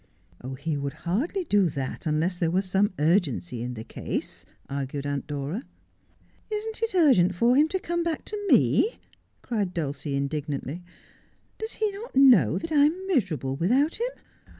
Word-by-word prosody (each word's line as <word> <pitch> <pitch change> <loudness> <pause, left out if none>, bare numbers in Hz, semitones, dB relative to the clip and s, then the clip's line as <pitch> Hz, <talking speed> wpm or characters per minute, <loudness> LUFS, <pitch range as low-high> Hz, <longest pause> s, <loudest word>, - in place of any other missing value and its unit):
' 130 +9 -8
He 160 -1 -1
would 140 -1 -3
hardly 280 - 0
do 205 - +3
that 135 +1 -4
unless 165 +4 0
there 165 - +2
were 185 +3 +1
some 195 +2 +1
urgency 155 - +1
in 125 +1 -4
the 110 - -6
case,' - - -5 0.2
argued 140 0 -4
Aunt 145 -1 -3
Dora. 150 - -3 0.4
' - - -35
Isn't 440 +1 -4
it 455 -4 -1
urgent 245 - +5
for 235 +7 +3
him 295 +3 +5
to 375 - -1
come 345 -1 -2
back 335 -2 -2
to 410 -1 -4
me? 445 - +4 0.2
' - - -42
cried 205 -7 -2
Dulcie 145 -3 -3
indignantly. 145 +2 -3 0.4
' - - -38
Does 440 +1 -4
he 430 -1 0
not 410 - -9
know 230 - +6
that 320 - -5
I 290 -2 +5
am 355 +5 0
miserable 180 - 0
without 260 - +2
him? - - +1
185 Hz, 175 wpm, -26 LUFS, -, 0.4 s, know